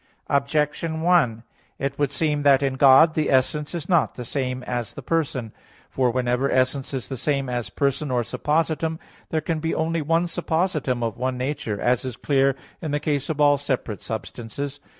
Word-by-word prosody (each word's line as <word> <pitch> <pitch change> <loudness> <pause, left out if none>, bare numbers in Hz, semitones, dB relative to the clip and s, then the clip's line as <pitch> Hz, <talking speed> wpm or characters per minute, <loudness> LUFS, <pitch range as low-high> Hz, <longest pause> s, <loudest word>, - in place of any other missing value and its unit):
Objection 150 +3 0
1: 140 -11 +3 0.3
It 140 0 -3
would 145 -2 +1
seem 150 +1 0
that 140 -1 +5
in 135 -1 +1
God 135 +4 +7
the 155 -1 0
essence 145 +4 +1
is 165 -1 -5
not 175 -4 +2
the 125 - -6
same 130 0 -2
as 120 -3 -4
person. 135 -6 -2 0.4
For 130 -2 +2
whenever 125 +2 0
essence 130 +1 +1
is 135 -3 -4
the 135 - -4
same 140 +1 0
as 120 -5 -3
person 140 +6 -1
or 125 -2 +1
suppositum, 160 +6 0 0.3
there 160 - 0
can 160 +1 -2
be 165 +1 -1
only 165 +1 0
one 165 +3 +2
suppositum 160 -7 -1
of 115 -2 -2
one 130 0 -1
nature, 125 -5 -3
as 125 0 +1
is 130 -2 -5
clear 135 -1 +2 0.3
in 160 - -3
the 145 +1 0
case 145 -2 -1
of 155 -2 -2
all 145 -1 +5
separate 130 -7 -3
substances. 120 +5 -5
140 Hz, 180 wpm, -24 LUFS, 125-155 Hz, 0.4 s, God